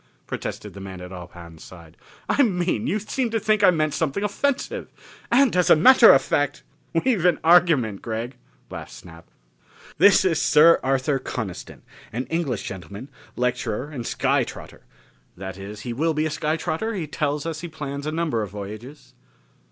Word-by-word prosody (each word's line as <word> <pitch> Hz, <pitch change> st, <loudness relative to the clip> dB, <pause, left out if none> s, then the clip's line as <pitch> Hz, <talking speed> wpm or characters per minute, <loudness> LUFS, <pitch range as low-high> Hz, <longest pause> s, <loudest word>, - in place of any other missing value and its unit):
protested -, -, -6 dB
the 100 Hz, -, -10 dB
man 95 Hz, -1 st, -8 dB
at 90 Hz, 0 st, -9 dB
Ob 90 Hz, -1 st, -10 dB
Hahn's 85 Hz, -2 st, -12 dB
side. 85 Hz, -3 st, -14 dB, 0.3 s
"I -, -, +2 dB
mean, 180 Hz, -8 st, 0 dB
you 205 Hz, -, 0 dB
seem 230 Hz, +4 st, -2 dB
to 225 Hz, 0 st, -1 dB
think 215 Hz, -1 st, +1 dB
I -, -, +8 dB
meant 155 Hz, -4 st, +1 dB
something 160 Hz, +5 st, -1 dB
offensive. 270 Hz, +7 st, -2 dB, 0.4 s
And 255 Hz, -1 st, +4 dB
as 180 Hz, -1 st, +2 dB
a -, -, +8 dB
matter 240 Hz, +8 st, +8 dB
of 135 Hz, -, +4 dB
fact 145 Hz, +1 st, -1 dB, 0.2 s
" 165 Hz, -, -3 dB
"We've 235 Hz, -10 st, +1 dB
an 180 Hz, -3 st, +4 dB
argument, 160 Hz, -, +4 dB
Gregg," 115 Hz, +3 st, -5 dB, 0.4 s
laughed -, -, -8 dB
Snap. 85 Hz, -2 st, -13 dB, 0.7 s
"This 190 Hz, +1 st, +6 dB
is 165 Hz, -5 st, +1 dB
Sir 165 Hz, +3 st, +6 dB
Arthur 135 Hz, +1 st, 0 dB
Coniston, 110 Hz, -7 st, -6 dB, 0.3 s
an 125 Hz, +4 st, -3 dB
English 155 Hz, -, -1 dB
gentleman, 100 Hz, +7 st, -8 dB, 0.3 s
lecturer 125 Hz, +2 st, -2 dB
and 125 Hz, -6 st, -6 dB
sky -, -, +1 dB
trotter -, -, -10 dB, 0.6 s
that 95 Hz, 0 st, -7 dB
is, 105 Hz, +2 st, -8 dB
he 120 Hz, +1 st, -5 dB
will 160 Hz, +5 st, 0 dB
be 155 Hz, +1 st, 0 dB
a 155 Hz, -, -2 dB
sky 155 Hz, +1 st, -1 dB
trotter; 220 Hz, +8 st, -3 dB
he 175 Hz, -5 st, -3 dB
tells 150 Hz, -1 st, -2 dB
us 160 Hz, -2 st, -4 dB
he 175 Hz, -, -5 dB
plans 140 Hz, -2 st, -6 dB
a -, -, -1 dB
number 155 Hz, -8 st, -1 dB
of 105 Hz, -, -4 dB
voyages." 105 Hz, +8 st, -9 dB
150 Hz, 180 wpm, -23 LUFS, 110-175 Hz, 0.7 s, I